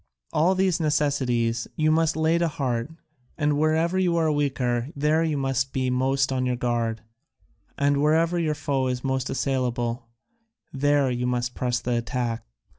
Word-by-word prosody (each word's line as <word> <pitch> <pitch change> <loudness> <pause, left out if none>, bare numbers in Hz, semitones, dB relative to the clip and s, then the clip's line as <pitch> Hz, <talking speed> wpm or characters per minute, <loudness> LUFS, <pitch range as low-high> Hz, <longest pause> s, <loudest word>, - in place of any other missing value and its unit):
All 175 +5 +3
these 185 -2 +1
necessities 130 -7 0
you 155 0 +2
must 160 0 +2
lay 160 +1 +2
to 170 - +2
heart, 130 -5 -2 0.5
and 150 -1 +1
wherever 160 +4 +2
you 175 -2 +2
are 160 -2 +2
weaker, 130 -4 0
there 150 +3 +2
you 155 -3 0
must 135 -1 -1
be 130 -1 0
most 135 +1 +1
on 130 -1 0
your 125 -1 0
guard, 120 -2 -1 0.8
and 140 0 +2
wherever 165 +3 +2
your 155 -2 0
foe 135 -3 -1
is 125 -1 -2
most 130 -1 -1
assailable, 125 -3 -1 0.7
there 140 -1 +2
you 125 0 -1
must 120 0 -1
press 125 -1 -1
the 125 0 -1
attack." 120 -1 -2
135 Hz, 160 wpm, -25 LUFS, 125-155 Hz, 0.8 s, All